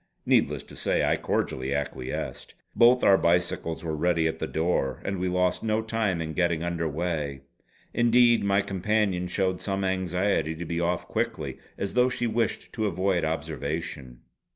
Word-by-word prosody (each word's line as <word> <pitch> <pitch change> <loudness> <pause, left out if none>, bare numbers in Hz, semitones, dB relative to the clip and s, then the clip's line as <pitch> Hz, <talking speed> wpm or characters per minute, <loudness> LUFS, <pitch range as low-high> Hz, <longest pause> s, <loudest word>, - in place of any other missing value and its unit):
Needless - - +2
to - - -13
say - - +1
I - - +3
cordially 65 +2 -1
acquiesced. 70 -3 -4 0.2
Both 120 +2 +5
our 95 -1 +6
bicycles 85 -1 0
were 80 -1 -2
ready 80 +1 +2
at 80 0 -3
the 80 - -2
door, 80 -5 0
and 95 -1 -2
we 90 - 0
lost 90 0 +1
no 110 0 0
time 110 -6 -1
in 80 0 -5
getting 85 -1 +1
under 85 -1 -1
weigh. 75 -3 -3 0.5
Indeed 120 -1 +4
my 100 0 +3
companion 100 -1 0
showed 95 0 -1
some 100 -1 -1
anxiety 95 -3 0
to 85 +2 -6
be 85 +1 -2
off 85 +1 -1
quickly, - - -3 0.2
as 100 - -3
though 125 +1 +4
she 125 -1 -1
wished 115 -1 -1
to 110 -3 0
avoid 95 -1 0
observation. 75 -4 -4
90 Hz, 165 wpm, -27 LUFS, 80-100 Hz, 0.5 s, our